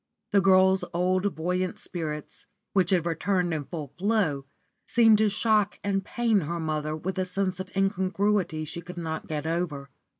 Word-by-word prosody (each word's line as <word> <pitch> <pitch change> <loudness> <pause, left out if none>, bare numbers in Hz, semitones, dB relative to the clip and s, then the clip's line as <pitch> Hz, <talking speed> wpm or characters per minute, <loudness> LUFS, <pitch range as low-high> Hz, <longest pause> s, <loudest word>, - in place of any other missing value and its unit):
The 200 -1 +5
girl's 190 0 +5
old, 185 +2 +1
buoyant 180 +3 -1
spirits, 155 -4 -6 0.3
which 185 -3 +3
had 180 -4 +2
returned 175 +1 0
in 150 -3 -3
full 150 -5 -7
flow, 180 -10 +1 0.4
seemed 225 -3 +5
to 215 -1 +4
shock 210 -1 +1
and 195 -1 0
pain 230 -2 +1
her 170 0 -3
mother 155 -1 -2
with 190 +4 -4
a - - +2
sense 185 0 -2
of 185 0 -5
incongruity 195 -3 +1
she 170 +3 -6
could 180 +1 -10
not 160 -2 -4
get 150 -1 -3
over. 160 -5 -2
180 Hz, 165 wpm, -27 LUFS, 160-195 Hz, 0.4 s, The